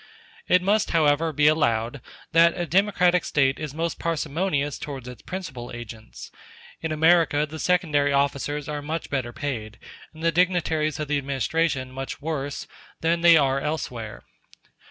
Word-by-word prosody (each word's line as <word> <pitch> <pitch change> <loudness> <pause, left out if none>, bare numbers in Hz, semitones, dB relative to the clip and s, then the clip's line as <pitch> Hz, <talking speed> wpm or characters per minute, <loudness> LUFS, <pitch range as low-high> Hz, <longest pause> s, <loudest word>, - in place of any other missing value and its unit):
It 180 0 +4
must, 205 +2 +2
however, 160 0 +2
be 150 -1 +1
allowed 120 -4 +2 0.3
that 170 +2 +4
a 175 - 0
democratic 180 0 +3
State 135 -2 +1
is 155 -2 -4
most 165 +1 -2
parsimonious 155 -2 -1
towards 135 -4 -7
its 125 -1 -9
principal 155 -11 -7
agents. 115 -2 -10 0.5
In 160 - -3
America 160 -1 +3
the 155 +1 -8
secondary 150 -6 +2
officers 140 +1 0
are 150 -1 -4
much 155 +3 -5
better 130 -4 -2
paid, 115 -6 -5 0.3
and 160 +1 -12
the 165 - +3
dignitaries 165 -4 +1
of 150 - -3
the 145 0 +1
administration 140 0 -1
much 135 +1 -6
worse, 145 -2 -4 0.4
than 165 +1 +1
they 170 -1 +7
are 135 -2 +2
elsewhere. 125 -7 -4
150 Hz, 150 wpm, -24 LUFS, 135-165 Hz, 0.5 s, they